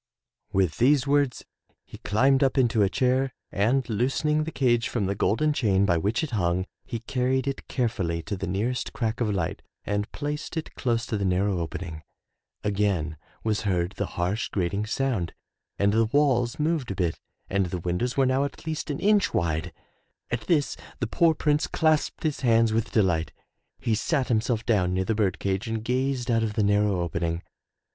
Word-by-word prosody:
'' - - -65
With 95 -4 +1
these 135 +2 +4
words 140 -3 +1 0.4
he - - -12
climbed 130 +6 +3
up 135 0 +1
into 115 -4 +3
a 100 - +4
chair 130 +3 +1 0.2
and 120 +6 +1
loosening 135 +7 +1
the 160 - -4
cage 120 -5 +2
from 110 -5 -1
the 100 - 0
golden 150 +10 +1
chain 100 -8 +2
by 85 -4 +2
which 105 - 0
it 155 - -3
hung, 90 -4 0 0.2
he 115 -4 -5
carried 130 +2 0
it 135 - -4
carefully 90 -9 -1
to 100 - -3
the 95 - -4
nearest 110 +8 -2
crack 115 0 -2
of 115 - +1
light 90 -5 -2 0.2
and 105 +1 -2
placed 150 +3 -4
it 160 - -4
close 120 -2 0
to 110 - -2
the - - -1
narrow 95 0 +1
opening. 80 -1 -5 0.6
Again 100 -6 0 0.3
was 110 -2 0
heard 90 -3 0
the 100 -1 -3
harsh, 90 +6 -1
grating 100 +3 -1
sound 115 -9 -1 0.4
and 100 0 +2
the 115 +1 +4
walls 125 -2 +2
moved 155 -4 0
a 100 - -3
bit 90 -4 -1 0.3
and 100 -1 +1
the 90 - -3
windows 90 +10 -2
were 135 - +4
now 130 +2 +2
at 140 - -6
least 155 -1 -3
an 145 - -2
inch 205 0 +3
wide. 80 -2 0 0.6
At - - -3
this 150 -5 +2 0.2
the - - 0
poor 165 -2 +3
Prince 150 0 +1
clasped 155 -2 +1
his 155 -3 0
hands 115 -3 +3
with 115 0 0
delight. 90 -8 +1 0.5
He 115 - 0
sat 130 +5 0
himself 115 0 +1
down 90 -6 +2
near 95 0 0
the 110 - +1
bird 105 -4 +1
cage 100 +3 -2
and 110 -1 -3
gazed 130 0 0
out 115 -1 +3
of 110 -2 -1
the 105 - +2
narrow 105 -2 +2
opening. 85 0 -2
110 Hz, 190 wpm, -26 LUFS, 95-130 Hz, 0.6 s, these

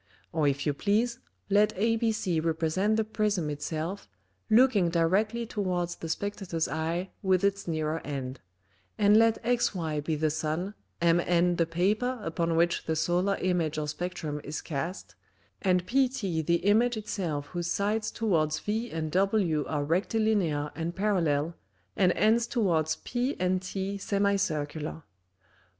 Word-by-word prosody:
Or 155 -3 +2
if 140 0 0
you 145 - +2
please, 225 - 0 0.3
let 210 +2 +3
ABC 220 -6 +1
represent 165 +6 +1
the 220 - +2
Prism 210 -7 -1
it 145 0 -6
self, 165 +6 -4 0.4
looking 220 -6 +5
directly 200 +8 +1
towards 180 -5 -2
the 165 - -6
Spectator's 185 -2 -2
Eye 165 +5 -2
with 190 -2 +2
its 200 -1 0
nearer 155 -1 -1
end: 135 -2 -5 0.6
And 205 0 +5
let 225 0 +5
XY 180 -11 0
be 155 +1 -1
the 155 0 +1
Sun, 155 +5 -2 0.3
MN 175 +1 +3
the 165 - +2
Paper 215 +9 0
upon 165 -1 -1
which 170 +1 +2
the 160 - +1
Solar 180 +5 +1
Image 175 -4 0
or 150 -1 -2
Spectrum 155 -2 -4
is 150 +2 -4
cast, 170 +4 -5 0.5
and 180 -2 +2
PT 235 - 0
the 170 0 +2
Image 225 +4 +3
it 215 - -7
self 155 -7 -2
whose 175 -1 -3
sides 210 +4 0
towards 160 -9 +1
v 225 +3 -2
and 155 -1 -3
w 185 -5 +2
are 145 -2 -1
Rectilinear 175 -3 +1
and 170 +1 -4
Parallel, 170 -6 +1 0.4
and 185 -2 +4
ends 230 +2 +3
towards 170 - +1
P 250 +3 -1
and 185 0 +1
T 195 +1 -4
Semicircular. 160 -7 -1
180 Hz, 145 wpm, -28 LUFS, 160-210 Hz, 0.6 s, looking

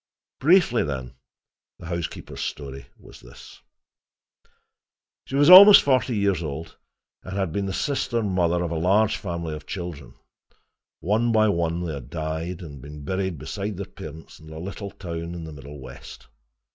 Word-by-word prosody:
Briefly, 160 -5 +4
then, 65 -4 -5 0.6
the - - -12
housekeeper's 85 -1 -5
story 70 -1 -6
was - - -15
this: - - -15 1.7
She 135 - -5
was 145 +1 +4
almost 195 +3 +11
forty 130 -3 +2
years 100 -4 +1
old, 80 +1 -6 0.5
and 95 +1 -7
had 95 -4 -1
been 100 +1 -2
the - - -3
sister 120 0 -1
mother 90 -3 +1
of 85 - -3
a 80 - -2
large 100 +5 +3
family 85 -4 -4
of 75 0 -9
children. 85 -9 -7 0.9
One 110 +5 +1
by 110 -1 +4
one 85 -1 -1
they 80 - -3
had 70 -4 -8
died, 80 +2 -4
and 70 -5 -10
been 75 +1 -10
buried 95 0 -2
beside 100 +8 -5
their 100 - -4
parents 80 -2 -11
in 80 - -14
a 80 - -9
little 100 +4 -6
town 85 -3 -6
in 85 - -7
the 80 -1 -8
Middle 70 0 -10
West. 65 -1 -11
85 Hz, 160 wpm, -24 LUFS, 80-100 Hz, 1.7 s, almost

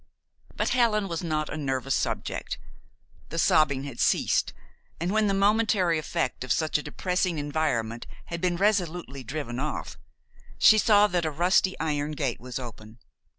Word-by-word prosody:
But - - 0
Helen 225 -5 +2
was 170 -1 -4
not 155 -2 -1
a - - -5
nervous 135 -2 -1
subject. - - -2 0.7
The 165 - -5
sobbing 145 -4 +3
had 140 -4 -8
ceased, - - +2 0.5
and 170 +3 -1
when 215 0 +2
the 200 - +1
momentary 200 -4 +2
effect 155 -5 -2
of 130 - -4
such 155 0 +1
a - - -4
depressing 180 +3 -1
environment 145 -6 -2 0.2
had 170 0 -6
been 180 -1 +1
resolutely 175 -8 0
driven 125 -1 -5
off, 150 +2 -4 0.6
she 215 - +7
saw 210 -1 +5
that 175 -4 0
a 160 - 0
rusty 180 +4 +2
iron 150 -1 -1
gate 140 -5 -2
was 125 0 -6
open. 115 -3 -9
155 Hz, 155 wpm, -27 LUFS, 140-185 Hz, 0.7 s, she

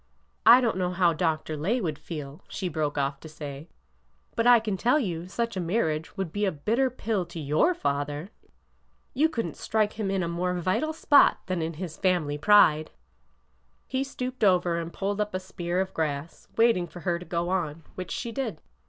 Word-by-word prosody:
I 245 +2 +10
don't 230 -6 +1
know 180 -1 0
how 180 -2 +3
Dr. 160 -1 -1
Lay 190 +12 0
would 155 -9 -3
feel," 150 -3 -7
she 190 - -4
broke 155 -3 -2
off 140 0 -1
to 160 - -11
say; 145 0 -8 0.3
'' 60 0 -40
but 230 - +2
I 245 -1 +8
can 215 -3 -2
tell 240 +9 +3
you 175 - -2
such 230 +3 -2
a - - -2
marriage 165 -2 -1
would 190 -4 -3
be 205 - -1
a 190 - +1
bitter 225 - +1
pill 225 -5 -2
to 170 -1 -8
your 155 - +2
father! 145 - -2 0.8
You 305 +5 +3
could 230 -8 -2
n't - - -7
strike 215 -1 0
him 205 -3 -1
in 195 -2 0
a - - -1
more 180 +2 -1
vital 185 - 0
spot 295 -2 +5
than 185 -2 -2
in 160 +1 -2
his 165 0 -6
family 170 -6 +1
pride! 155 -4 +5 0.5
" 60 0 -41
He 265 - +2
stooped 255 -2 -5
over 180 -3 +3
and 165 0 -5
pulled 200 +3 -2
up 210 -2 -2
a - - 0
spear 180 -1 -3
of 190 0 -2
grass, 155 0 -3
wait 230 -1 +5
ing 175 -1 -2
for 175 +1 -11
her 175 -1 0
to 180 - -10
go 170 0 -2
on, 165 -4 -2
which 185 -2 -6
she 235 - -4
did. 225 - -3
180 Hz, 210 wpm, -27 LUFS, 155-210 Hz, 0.8 s, I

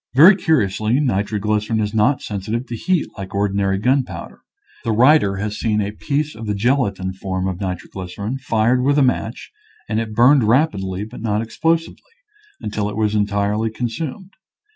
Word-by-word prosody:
Very 170 +9 +9
curiously, 115 - +1
nitroglycerin 105 -2 0
is 105 0 -1
not 110 +6 +2
sensitive 105 +4 -3
to 120 - -6
heat 175 +7 0
like 95 0 -7
ordinary 100 -1 +1
gunpowder. 125 +5 -1 0.4
The 115 - -1
writer 125 -3 +4
has 105 +2 -4
seen 105 -2 0
a 100 0 -1
piece 150 +7 -2
of 110 0 -8
the 105 - -1
gelatin 100 -5 0
form 95 0 -3
of 95 +1 -4
nitro 90 -2 -4
glycerin 100 +7 -5
fired 120 -1 +1
with 140 +3 +2
a 145 - +5
match, 125 -2 -1 0.4
and 110 0 -1
it 110 -1 -4
burned 125 +3 +5
rapidly, 105 - +1
but 110 +1 -10
not 110 -1 0
explosively, 165 - -2 0.5
until 105 -1 -3
it 105 - -6
was 110 -1 +1
en 105 -1 +2
tirely 105 +2 0
consumed. 130 - -5
110 Hz, 165 wpm, -20 LUFS, 100-130 Hz, 0.5 s, Very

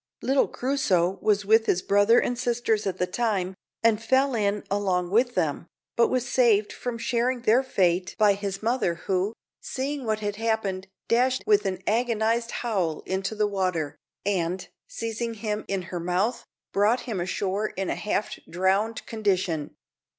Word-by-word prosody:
Little 270 +1 +3
Crusoe 195 -9 0
was 205 -2 +2
with 220 +2 +4
his 180 - +1
brother 205 +4 +4
and 245 - 0
sisters 235 -3 0
at 185 -1 -2
the 180 - +1
time, 190 -2 -1 0.3
and 225 -1 +3
fell 265 +4 +2
in 205 -2 0
along 185 -3 0
with 245 +4 +2
them, 160 +2 -1 0.3
but 235 - +4
was 255 -1 -1
saved 225 -5 +3
from 245 -2 -4
sharing 240 +2 0
their 240 +3 +5
fate 185 -8 +1
by 210 -2 +5
his 195 0 -4
mother, 230 -7 +1
who, 190 +4 -1 0.3
seeing 275 +1 -3
what 215 -2 -1
had 205 -1 -3
happened, 210 -4 -1 0.2
dashed 255 +2 +2
with 415 - +3
an 185 -1 -3
agonized 230 +1 +1
howl 190 -12 -1
into 190 +3 -2
the 210 0 +2
water, 185 -7 -1 0.3
and, 185 -2 -1 0.2
seizing 230 - -4
him 210 -1 -3
in 195 -2 -2
her 175 0 -5
mouth, 185 +8 -1 0.3
brought 210 +5 +3
him 220 -7 -4
ashore 195 +3 -1
in 190 -2 -3
a - - -1
half 210 0 -2
drowned 190 +6 0
condition. 190 -8 -1
210 Hz, 160 wpm, -26 LUFS, 190-235 Hz, 0.3 s, their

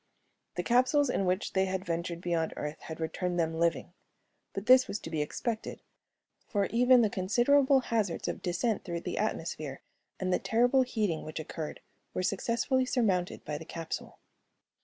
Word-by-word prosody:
The - - -1
capsules 255 +3 +3
in 195 - 0
which 185 +2 0
they 190 0 +3
had 190 0 -3
ventured 170 0 -3
beyond 170 -2 -1
Earth 150 +1 -4
had 160 0 -8
returned 175 +2 -2
them 165 -1 +1
living. 170 0 0 0.6
But 195 - -5
this 255 +1 +7
was - - -2
to 165 - -7
be 155 -2 0
expected, 220 +9 -3 0.7
for 200 -2 +1
even 245 +1 +6
the 215 - +3
considerable 260 +8 +4
hazards 220 -8 -1
of - - -3
descent 195 +5 0
through 170 -2 -4
the - - -3
atmosphere 155 -9 -3 0.4
and 185 -1 0
the - - +2
terrible 245 +4 +3
heating 215 -10 -1
which 155 +1 -6
occurred 155 0 -6 0.3
were 185 - 0
successfully 235 +7 +1
surmounted 195 -9 0
by 150 -1 -3
the - - -8
capsule. 165 0 -6
190 Hz, 165 wpm, -30 LUFS, 170-240 Hz, 0.7 s, this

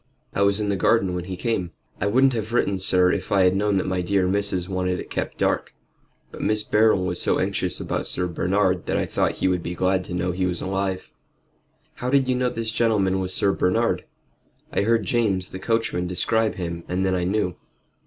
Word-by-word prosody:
"I - - -1
was 100 +1 +3
in 105 -1 -1
the 100 - +1
garden 95 0 +2
when 90 -1 -3
he 95 -1 -5
came. 95 -5 -2 0.3
I 100 - 0
wouldn't 130 +5 +4
have 110 0 -3
written, 100 -5 +1
sir, 90 -1 +3
if - - -3
I 100 -2 +4
had 90 0 +4
known 100 0 +1
that 95 - 0
my 95 -1 -1
dear 95 +1 +1
missus 95 -2 -1
wanted 90 -1 -1
it - - -8
kept - - -3
dark. - - 0 0.6
But - - -9
Mr. 105 0 0
Beryl 105 -3 +4
was 90 -1 -1
so - - +2
anxious - - -1
about - - -2
Sir 90 - -1
Bernard 90 +2 0
that - - 0
I - - 0
thought - - 0
he - - -1
would 90 -1 +1
be 85 +1 -5
glad 95 +1 +1
to 90 - -5
know 90 +1 0
he 90 +1 -1
was 90 -1 -2
alive." 95 -1 -2 0.8
"How 125 - -4
did 135 -1 +3
you 130 - +2
know 125 0 +1
this 115 -2 -3
gentleman 105 -5 +1
was 95 -1 -2
Sir 100 +1 +2
Bernard?" 90 -1 +1 0.7
"I - - +2
heard 115 0 +2
James 95 -3 0
the 95 - -6
coachman 115 -5 -1
describe 110 +5 0
him, 85 -2 -5
and 90 +2 -1
then 95 - +1
I 90 -1 0
knew." 90 -1 0
95 Hz, 220 wpm, -23 LUFS, 90-105 Hz, 0.8 s, wouldn't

